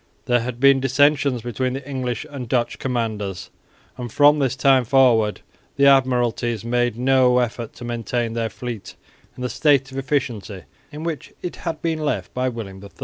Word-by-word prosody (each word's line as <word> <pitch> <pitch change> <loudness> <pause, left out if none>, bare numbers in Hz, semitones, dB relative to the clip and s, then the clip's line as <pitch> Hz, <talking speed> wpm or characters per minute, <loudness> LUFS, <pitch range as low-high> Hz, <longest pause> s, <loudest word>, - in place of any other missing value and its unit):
There 120 0 +3
had 120 +1 -5
been 140 0 +5
dissensions 135 -1 +2
between 125 +1 -2
the 135 +1 -6
English 130 -2 -3
and 135 -6 -7
Dutch 120 -1 0
commanders, 110 -7 -3 0.5
and 120 -2 -6
from 145 +3 +5
this 135 -2 0
time 135 0 +4
forward 120 -4 +3 0.3
the 140 - +1
admiralties 120 -4 +2
made 120 -1 0
no 125 0 +3
effort 120 -2 -2
to 120 - -10
maintain 120 0 -2
their 115 -1 -1
fleet 120 -4 -7 0.4
in 125 - -6
the - - 0
state 140 -3 +2
of 135 - -4
efficiency 125 -8 -3 0.3
in 150 +1 -7
which 165 -3 -5
it 180 - -5
had 165 -2 -5
been 165 -2 -1
left 150 -1 -2
by 130 0 0
William 100 -5 -8
III. 100 - -10
125 Hz, 175 wpm, -22 LUFS, 120-135 Hz, 0.5 s, been